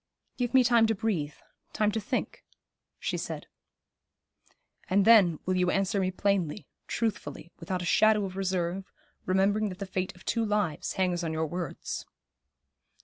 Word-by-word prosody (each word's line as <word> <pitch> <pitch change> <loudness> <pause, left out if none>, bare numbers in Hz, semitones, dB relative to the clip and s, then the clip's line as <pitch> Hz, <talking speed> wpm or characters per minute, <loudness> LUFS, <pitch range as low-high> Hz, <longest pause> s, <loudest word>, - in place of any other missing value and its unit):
'Give 245 0 -1
me 260 - +7
time 235 -2 +5
to 225 - +1
breathe, 190 -9 -1 0.4
time 210 -1 +2
to 220 +1 -2
think,' 205 - -3 0.5
she - - -2
said. - - -5 1.4
'And 195 +1 +3
then 200 -8 +7
will 185 - +1
you 180 -1 +2
answer 195 +1 +1
me 185 -1 +1
plainly, 190 -1 0 0.2
truthfully, 170 -8 -3
without 180 +1 -3
a - - -4
shadow 215 +3 +4
of 185 -1 -6
reserve, 185 -1 -2 0.4
remembering 200 +3 +2
that 185 - -7
the 200 - -4
fate 185 -1 -3
of 180 - -17
two 230 - +1
lives 210 -7 -1
hangs 180 -2 0
on 160 -1 -2
your 160 0 0
words.' 170 0 -5
190 Hz, 155 wpm, -29 LUFS, 180-210 Hz, 1.4 s, me